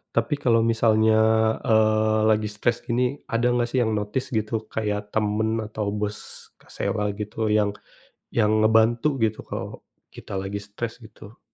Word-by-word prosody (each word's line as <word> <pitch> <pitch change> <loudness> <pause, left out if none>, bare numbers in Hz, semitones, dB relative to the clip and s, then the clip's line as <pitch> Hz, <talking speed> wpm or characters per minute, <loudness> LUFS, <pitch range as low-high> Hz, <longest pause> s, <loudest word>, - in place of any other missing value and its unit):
Tapi 115 +5 +1
kalo 120 -5 +2
misalnya, 110 -1 +3 0.5
eee, 110 0 +3
lagi 110 -1 +2
stres 120 +3 -1
gini, 125 +3 0 0.2
ada 115 +1 +2
nggak, 120 -1 +1
sih, 130 - +1
yang 110 -2 +1
notice 105 +5 -2
gitu 110 0 -2
kayak 105 -1 -3
temen 110 +1 0
atau 105 -1 -4
bos 105 0 -5
Kak - - -24
Sela 105 0 -1
gitu 105 +1 -3
yang 105 -1 +2 0.6
yang 110 -1 +2
ngebantu 115 +4 +3 0.2
gitu 110 -1 -1
kalo - - -7 0.3
kita 100 - -8
lagi 95 +2 -4
stres 110 +4 -6
gitu? 110 -1 -14
110 Hz, 150 wpm, -24 LUFS, 105-115 Hz, 0.6 s, misalnya